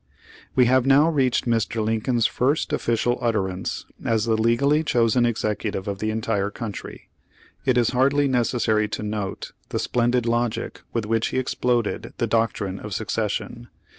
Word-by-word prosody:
We 125 - +5
have 130 +1 +3
now 140 +3 +6
reached 135 -6 +1
Mr. 115 -1 0
Lincoln's 115 +2 +1
first 145 +4 +1
official 120 -3 0
utterance 95 -5 -2 0.2
as 110 -2 +1
the 115 -1 +2
legally 135 +7 +2
chosen 120 -3 +2
executive 105 -3 -2
of 100 -1 -3
the 110 - -1
entire 110 -2 -1
country. 105 -2 -7 0.6
It 130 -2 +3
is 120 -2 +3
hardly 140 +3 +2
necessary 115 -4 +1
to 105 - -4
note 105 -2 -4 0.2
the - - -2
splendid 120 0 +1
logic 120 -1 -1
with 115 -2 -2
which 115 +1 +1
he - - -3
exploded 125 -3 -1
the - - +1
doctrine 105 -4 -1
of 105 -3 -6
secession. 115 +2 -3
115 Hz, 150 wpm, -23 LUFS, 110-125 Hz, 0.6 s, now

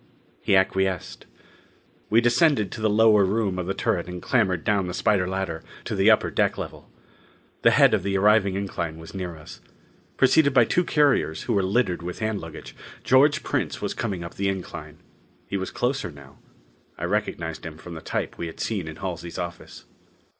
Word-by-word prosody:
He 100 - +2
acquiesced. 95 -1 0 0.8
We 115 +2 +5
descended 120 - +3
to 110 - -7
the 110 - +2
lower 105 -1 +5
room 95 -1 0
of 90 - -3
the 95 - -2
turret 105 -8 -1
and 90 0 -6
clambered 95 -6 +1
down 100 -3 +1
the 90 - -4
spider 95 -4 +2
ladder 95 -3 -3 0.2
to - - -3
the - - +4
upper - - +4
deck - - +1
level. - - -8 0.7
The - - +6
head - - +5
of - - +2
the 100 0 -1
arriving 100 -1 +4
incline 85 -5 -3
was 80 0 -11
near 90 -3 -5
us. 75 - -12 0.6
Preceded 140 +1 +4
by 120 - +6
two 180 - +1
carriers 145 - +2
who 120 - -1
were 100 - +3
littered 95 -1 0
with 90 +1 -6
hand 110 -2 -2
luggage, 80 -1 -10 0.3
George 140 +3 +4
Prince - - -2
was - - -3
coming 95 -6 -3
up 85 - -8
the 100 0 -1
incline. 95 -2 -6 0.5
He - - -5
was 95 -1 -2
closer 125 -6 -1
now. 70 -3 -15 0.6
I - - -7
recognized 80 -1 -2
him 80 -2 -7
from 85 +1 -10
the 80 - -8
type - - -4
we 85 - -3
had 80 - -10
seen 100 -7 -2
in 80 - -7
Halsey's 85 -3 -6
office. 85 -1 -7
95 Hz, 190 wpm, -24 LUFS, 85-110 Hz, 0.8 s, The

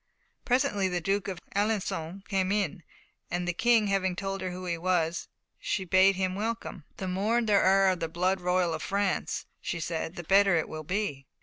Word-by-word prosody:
Presently 245 -6 +2
the 180 -1 -1
Duke 195 +3 -1
of 190 -3 -4 0.2
Alençon 200 -3 -1
came 190 -2 0
in, 200 -3 0 0.5
and 175 0 -2
the 175 - 0
King 225 +3 +3
having 190 -2 0
told 195 +1 -3
her 185 - -2
who 180 +1 -6
he 170 -1 -1
was, 170 -1 0 0.3
she 190 - -2
bade 190 +2 +5
him 185 0 0
welcome. 210 -5 -4
"The 190 - -4
more 200 +6 +1
there 210 -4 +3
are 195 +1 +5
of 185 -2 0
the 165 - -2
blood 180 +3 0
royal 180 -1 +1
of - - -4
France," 200 -1 -1 0.2
she 170 - -3
said, 165 +1 -3
"the 175 - -6
better 195 +2 +5
it 160 - 0
will 155 0 -6
be." 155 -6 -3
190 Hz, 195 wpm, -28 LUFS, 175-200 Hz, 0.5 s, bade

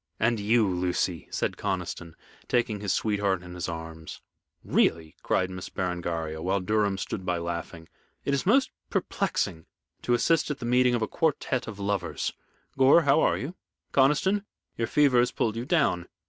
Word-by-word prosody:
"And 115 0 +2
you, 110 +1 +3
Lucy," 90 -2 -1
said - - -2
Conniston, 85 -2 -4 0.3
taking 120 -4 +1
his 100 -2 -2
sweetheart 100 -4 0
in 90 0 -9
his 90 0 -4
arms. 80 -1 -7 0.4
"Really," 80 -1 +1
cried 95 0 0
Miss 95 -1 -7
Berengaria, 85 -4 -3
while 95 +3 +1
Durham 105 0 +1
stood 95 - -4
by 90 -1 0
laughing, 85 -1 -5 0.4
"it 140 - +1
is 140 - +1
most 255 +8 +3 0.2
perplexing 80 0 -1 0.3
to 120 - +2
assist 165 +7 +2
at 150 - -2
the 120 - -6
meeting 125 0 +3
of 115 - 0
a - - 0
quartette 140 -4 0
of 110 -2 -7
lovers. 100 -3 -2 0.5
Gore, 135 +5 +7
how 140 +2 +4
are - - +3
you? 145 +6 -5 0.4
Conniston, 150 +9 +3 0.3
your 115 - -1
fever 140 -4 +4
has 120 - +3
pulled 110 -1 -1
you 115 +2 -3
down. 135 - +1
105 Hz, 165 wpm, -27 LUFS, 90-125 Hz, 0.5 s, Gore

